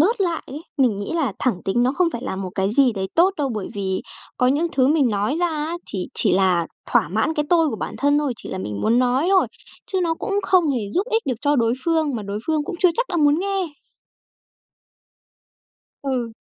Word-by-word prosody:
bớt 415 +7 +3
lại 340 -3 0
ấy, 295 +4 -8 0.2
mình 235 -7 +3
nghĩ 205 - -4
là 290 -11 0
thẳng 215 -9 -1
tính 240 +5 +1
nó 255 +2 +2
không 355 +2 +2
phải 235 - -5
là 190 - -3
một 190 -1 -4
cái 195 +1 0
gì 260 -2 +4
đấy 190 -2 -3
tốt 355 +4 +5
đâu. 285 -3 0
Bởi 205 -3 -4
vì 190 -2 -2 0.3
có 250 - +2
những 290 +6 +2
thứ 260 -1 +3
mình 285 -5 +3
nói 205 +7 0
ra 350 - +3
á, 315 +1 -3 0.2
thì 185 -3 -3
chỉ - - +2
là 180 -3 +3 0.3
thỏa - - +3
mãn 220 - 0
cái 300 - 0
tôi 330 -3 +4
của - - -4
bản 215 - -5
thân 285 +1 +3
thôi, 290 -4 0
chỉ - - -9
là - - -4
mình 100 +1 -4
muốn 230 +3 +3
nói 255 +5 +2
thôi, 380 -1 +4 0.4
chứ 380 - -1
nó 330 -2 +1
cũng 400 +4 -4
không 355 -6 +3
hề 220 -7 -2
giúp 380 - 0
ích 450 0 +2
được 255 -4 -1
cho 290 0 +2
đối 230 0 +2
phương 320 -4 +1
mà 215 - -4
đối 200 +1 -4
phương 310 -2 +1
cũng 350 - -5
chưa 365 - +5
chắc - - +1
đã 350 - -2
muốn 295 -1 +4
nghe. 390 -1 -1 2.4
Ừ. 250 -4 -2
275 Hz, 235 wpm, -22 LUFS, 215-330 Hz, 2.4 s, tốt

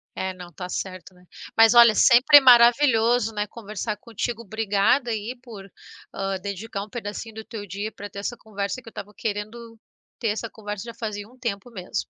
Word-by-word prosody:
É, 190 0 -3
não 180 -1 -11
tá 180 +2 -7
certo, 185 0 -6
né. 180 0 -22 0.3
Mas 225 +1 +7
olha, 235 -2 +8
sempre 260 +4 +7
maravilhoso, 240 -2 +5
né, 210 0 -2
conversar 215 -1 -5
contigo. 230 0 -5
Obrigada 220 +3 +1
aí 225 +3 -4
por, 205 -6 -12 0.4
hã, 195 0 -2
dedicar 200 +1 -5
um 210 - -12
pedacinho 220 0 -7
do 220 - -8
teu 220 -3 -7
dia 200 +3 -5
para 205 -1 -9
ter 200 - -8
essa 240 +4 -4
conversa, 205 +2 -5
que 230 - -12
eu - - -22
estava 210 0 -9
querendo 225 +2 -5 0.4
ter 225 - 0
essa 220 +2 -3
conversa 210 -1 -7
já 235 - -8
fazia 210 -1 -6
um 255 - -20
tempo 235 -1 -4
mesmo. 185 -4 -5
220 Hz, 190 wpm, -24 LUFS, 200-235 Hz, 0.4 s, olha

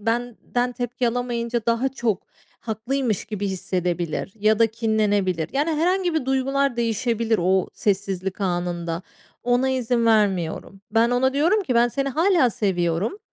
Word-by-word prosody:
benden 245 +2 -1
tepki 245 0 -1
alamayınca 235 -1 -2
daha 235 +3 +2
çok 240 -7 -2 0.3
haklıymış 230 0 -2
gibi 210 -2 -4
hissedebilir 180 -2 -2
ya 215 +1 +3
da 230 - +6
kinlenebilir. 205 -7 0
Yani 290 +4 +1
herhangi 350 +3 +1
bir 315 -5 0
duygular 270 0 +1
değişebilir 230 -1 0
o 185 +1 +2
sessizlik 195 -1 -1
anında. 175 -2 -2 0.4
Ona 245 +2 +2
izin 245 -2 +1
vermiyorum. 195 -4 +1
Ben 225 +2 +3
ona 260 +2 +2
diyorum 350 +9 +3
ki 255 -9 -2
"Ben 235 +1 +4
seni 275 +3 -2
hâlâ 330 -2 +3
seviyorum. 185 - -1
230 Hz, 135 wpm, -23 LUFS, 195-255 Hz, 0.4 s, da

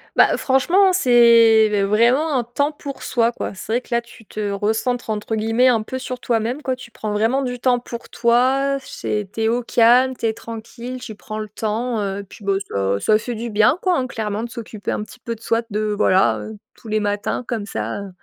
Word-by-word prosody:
Bah - - +5
heu, - - +1
franchement, 360 +9 +3
c'est 230 - +5
vraiment 245 +9 +3
un 240 - 0
temps 285 +5 -1
pour 285 -2 -8
soi 235 -1 +1
quoi. 205 - -5
C'est 220 - -5
vrai 245 - +1
que - - -23
là, 235 - +3
tu 235 -1 -15
te 205 -1 -4
«recentres», 220 +5 -1
entre 215 +1 -2
guillemets, 225 +4 +3
un 230 -3 +2
peu 260 +4 -5
sur 255 -1 -5
toi-même 240 +4 -1
quoi, 260 -2 -1
tu 250 -2 -13
prends 215 -1 -4
vraiment 225 +6 +1
du 250 -2 -3
temps 245 0 +2
pour 235 -1 -9
toi, 260 +4 +2
c'est 210 -5 -4
tu 225 - -4
es 220 - +2
au 240 +2 0
calme, 245 +3 +4
tu 230 - -2
es 220 - 0
tranquille, 235 +3 -8
tu 220 -4 -8
prends 215 +1 -7
le 215 -1 -5
temps, 220 +2 -2
heu, 200 0 -3
puis, 205 - -13
bah 200 - +2 0.2
ça 100 0 0
ça 215 - +3
fait 240 +3 -5
du 235 +1 -5
bien 215 - +3
quoi, 365 -2 +2
hein, 255 - 0
clairement, 220 -2 -3
de 235 - -6
s'occuper 220 -3 -6
un - - -2
petit 250 +4 -10
peu 235 0 -4
de 225 - -13
soi 230 0 0
de 210 0 -1
voilà, 150 - +3
heu, 105 +1 -8 0.2
tous 225 - -12
les 215 0 +1
matins 205 +4 -2
comme 225 -4 -3
ça, 115 - -4
heu, 200 - -8
230 Hz, 230 wpm, -20 LUFS, 215-250 Hz, 0.2 s, Bah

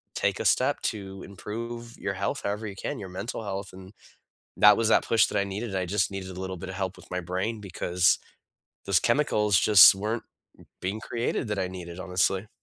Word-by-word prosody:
take - - 0
a - - -3
step - - +3
to 95 -2 -4
improve 115 +4 -7
your - - -3
health - - -2
however 105 +2 -2
you 100 - -7
can, - - -4
your 95 - -7
mental 95 +5 -5
health, 100 -1 -5
and 95 0 -12 0.7
that 105 0 +7
was 115 - +1
that - - +4
push 115 - +4
that - - -2
I - - +2
needed, 100 +2 -5
I 95 -1 0
just 95 +2 0
needed 95 -1 -5
a 95 0 -7
little 95 0 -4
bit 90 +2 -8
of 95 - -6
help 95 -1 -3
with - - -16
my 90 - -2
brain 95 +6 -3
because 90 -2 +1 0.7
those 100 -1 +3
chemicals 105 -7 +2
just 105 -2 +9
weren't 110 +4 -3 0.6
being 95 +4 -3
created, 115 +1 -2
that 105 -1 -2
I 95 -1 -1
needed, 90 -1 -8
honestly. 95 +2 0
100 Hz, 205 wpm, -27 LUFS, 95-105 Hz, 0.7 s, just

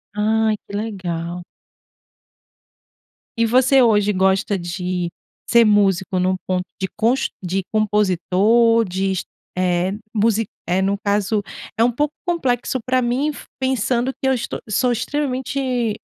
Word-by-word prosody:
Ai, 220 +1 +2
que 200 - -11
legal. 180 -5 -4 1.9
E 230 - +3
você 260 +3 +4
hoje, 210 -3 +3
gosta 190 +2 +2
de 180 0 -3 0.4
ser 235 0 +6
músico 195 -2 +2
num 185 +1 +2
ponto 185 -1 0 0.2
de 190 - -1
cons 235 +5 +1
de 190 +2 -1
compositor, 210 +3 +3
de 190 +1 -1
es 185 - -2 0.3
eh, 180 +1 +1 0.2
musi 225 0 +2 0.2
eh, 180 +2 +1
no 200 +1 +1
caso 205 +1 +1 0.3
é 225 - +4
um 245 - +3
pouco 295 +5 -1
complexo 260 -7 0
pra 255 +1 +1
mim, 255 +5 0
f 295 - -8
pensando 260 0 0
que 265 - -3
eu 265 - +4
est 245 - -2 0.2
sou 245 +4 +2
extremamente 255 -2 -1
215 Hz, 135 wpm, -20 LUFS, 190-245 Hz, 1.9 s, ser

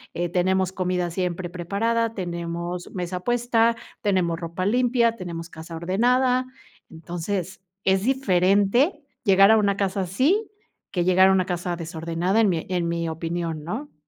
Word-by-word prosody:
eh, 175 0 -1
tenemos 185 +1 +1
comida 180 -2 -1
siempre 180 -1 -3
preparada, 225 +6 -1
tenemos 170 -1 -4
mesa 180 0 -3
puesta, 235 +1 +2 0.3
tenemos 180 -5 +1
ropa 170 +2 -4
limpia, 235 0 +2
tenemos 170 -4 -6
casa 165 +1 -9
ordenada. 250 +9 +2 0.4
Entonces, 175 +3 -5 0.2
es 190 0 +3
diferente 230 - +2 0.2
llegar 195 +1 +6
a 220 - +6
una 200 -2 +1
casa 195 0 -1
así 280 - +1 0.4
que 175 -3 0
llegar 185 +1 +5
a - - +5
una 185 -1 +2
casa 175 -1 -2
desordenada, 170 +5 -1
en 210 - +4
mi 165 -3 -1
en 175 -2 0
mi 170 0 -2
opinión, 165 -1 -3
¿no? 220 - -6
185 Hz, 145 wpm, -24 LUFS, 170-220 Hz, 0.4 s, llegar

